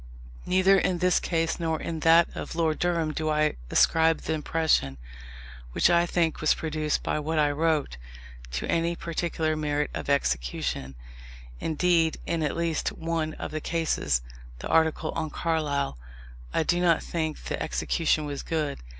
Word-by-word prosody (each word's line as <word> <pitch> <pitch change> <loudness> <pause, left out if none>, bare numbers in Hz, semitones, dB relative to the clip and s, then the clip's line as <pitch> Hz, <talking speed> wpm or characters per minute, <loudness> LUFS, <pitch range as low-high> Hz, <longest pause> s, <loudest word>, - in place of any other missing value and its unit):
Neither 185 +1 +4
in 180 - 0
this 180 +1 +3
case 165 -1 -1
nor 160 -2 -1
in 165 -1 -4
that 165 +2 +6
of - - -6
Lord 160 -2 0
Durham 170 -3 0
do 155 0 -2
I 150 0 +2 0.2
ascribe 160 0 +3
the - - -2
impression, 155 - +1 0.8
which 175 - +4
I 170 0 +4
think 170 -2 0
was 155 - +3
produced 155 -1 -2
by - - -1
what 155 +2 -2
I 150 -1 +3
wrote, 150 - 0 0.6
to - - -2
any 170 +1 +1
particular 165 -2 -2
merit 150 -1 -1
of - - -5
execution: 65 - -1 0.6
indeed, 165 0 +2
in 170 -1 -1
at 150 0 -1
least 165 -2 -1
one 160 -1 -2
of - - -6
the 155 0 -4
cases 150 - 0 0.3
(the - - -7
article 160 -1 +2
on 160 -1 -3
Carlyle) 145 - -1 0.5
I - - +1
do 175 +3 +1
not 170 -2 +3
think 160 -2 -3
the - - -4
execution 155 -2 0
was 145 -1 -4
good. 155 -3 -2
160 Hz, 160 wpm, -27 LUFS, 150-165 Hz, 0.8 s, that